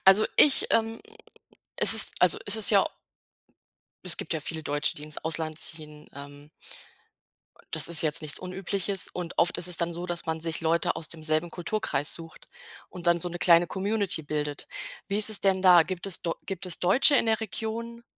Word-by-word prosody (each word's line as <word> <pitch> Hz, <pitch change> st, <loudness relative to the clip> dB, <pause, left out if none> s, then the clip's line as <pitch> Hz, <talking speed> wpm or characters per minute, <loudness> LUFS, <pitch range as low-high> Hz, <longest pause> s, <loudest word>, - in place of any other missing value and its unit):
Also, 195 Hz, +3 st, +5 dB
ich, 290 Hz, -2 st, +5 dB
ähm 225 Hz, 0 st, 0 dB, 0.8 s
es -, -, +9 dB
ist -, -, +6 dB
also, -, -, +4 dB
es -, -, +5 dB
ist 220 Hz, -, +4 dB
ja 200 Hz, -3 st, +4 dB, 1.2 s
Es 180 Hz, -, -3 dB
gibt -, -, -6 dB
ja 155 Hz, -, -3 dB
viele 160 Hz, +1 st, -6 dB
Deutsche, 145 Hz, 0 st, -2 dB
die 150 Hz, -, -10 dB
ins 150 Hz, -1 st, -5 dB
Ausland 160 Hz, -1 st, -3 dB
ziehen, 150 Hz, -2 st, -5 dB
ähm 145 Hz, +1 st, -12 dB, 1.2 s
das -, -, 0 dB
ist 170 Hz, -2 st, +2 dB
jetzt 155 Hz, 0 st, +1 dB
nichts 150 Hz, -1 st, -2 dB
Unübliches. 190 Hz, +1 st, -4 dB
Und 180 Hz, -1 st, -7 dB
oft 175 Hz, +1 st, +1 dB
ist 180 Hz, -, 0 dB
es 175 Hz, -, +1 dB
dann 170 Hz, 0 st, -2 dB
so, 175 Hz, +2 st, -7 dB
dass 175 Hz, -1 st, -4 dB
man 160 Hz, 0 st, -3 dB
sich 165 Hz, -1 st, -2 dB
Leute 165 Hz, 0 st, 0 dB
aus 160 Hz, -, -4 dB
demselben 155 Hz, +1 st, -2 dB
Kulturkreis 170 Hz, -5 st, -2 dB
sucht 165 Hz, -1 st, -9 dB, 0.4 s
und 180 Hz, -1 st, -10 dB
dann 170 Hz, 0 st, +2 dB
so 175 Hz, -, -2 dB
'ne 175 Hz, 0 st, -7 dB
kleine 170 Hz, 0 st, +4 dB
Community 200 Hz, -2 st, -3 dB
bildet. 150 Hz, -1 st, -5 dB, 0.4 s
Wie 200 Hz, +1 st, -1 dB
ist 215 Hz, -, +5 dB
es 215 Hz, -, +2 dB
denn 190 Hz, -1 st, +1 dB
da? 180 Hz, -2 st, +7 dB
Gibt 185 Hz, +2 st, -6 dB
es 190 Hz, -, +1 dB
do 165 Hz, -, -2 dB
gibt 190 Hz, -2 st, -6 dB
es 180 Hz, -, -2 dB
Deutsche 255 Hz, -, +4 dB
in 230 Hz, -, +1 dB
der 220 Hz, 0 st, +1 dB
Region? 230 Hz, +2 st, -6 dB
175 Hz, 195 wpm, -26 LUFS, 160-195 Hz, 1.2 s, es